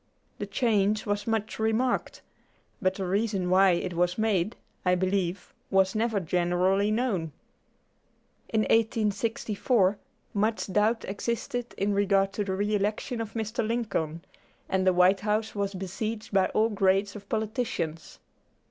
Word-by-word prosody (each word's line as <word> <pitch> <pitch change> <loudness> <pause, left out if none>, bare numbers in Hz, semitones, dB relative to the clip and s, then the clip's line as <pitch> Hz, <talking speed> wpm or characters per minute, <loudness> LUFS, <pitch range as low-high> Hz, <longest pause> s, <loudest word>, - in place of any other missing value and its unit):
The 205 - -3
change 210 -1 +1
was 205 0 -2
much 220 -1 -1
remarked, 225 +3 0 0.6
but 185 0 +1
the 195 - -3
reason 195 -1 0
why 190 0 +6
it 175 +1 -2
was 175 +1 +1
made, 215 -1 +1 0.3
I 180 0 +3
believe, 185 0 -1 0.2
was 190 0 +3
never 220 -1 +1
generally 180 +3 +1
known. 215 - -1 1.2
In 220 - +2
1864 215 -1 +1 0.3
much 215 -1 0
doubt 215 +3 +2
existed 235 +4 -3
in 200 +1 +1
regard 195 -1 +2
to 210 - -1
the 195 -1 -2
re 205 +2 -1
election 210 +4 -1
of 220 -2 -6
Mr. 225 0 -2
Lincoln, 210 -8 -2 0.4
and 190 0 0
the 185 - +5
White 180 +2 +4
House 215 +2 -1
was 200 -1 -2
besieged 210 +4 -4
by 190 -1 +4
all 220 +1 +2
grades 195 0 +1
of 200 -1 -10
politicians. 215 -7 -3
205 Hz, 140 wpm, -27 LUFS, 190-220 Hz, 1.2 s, why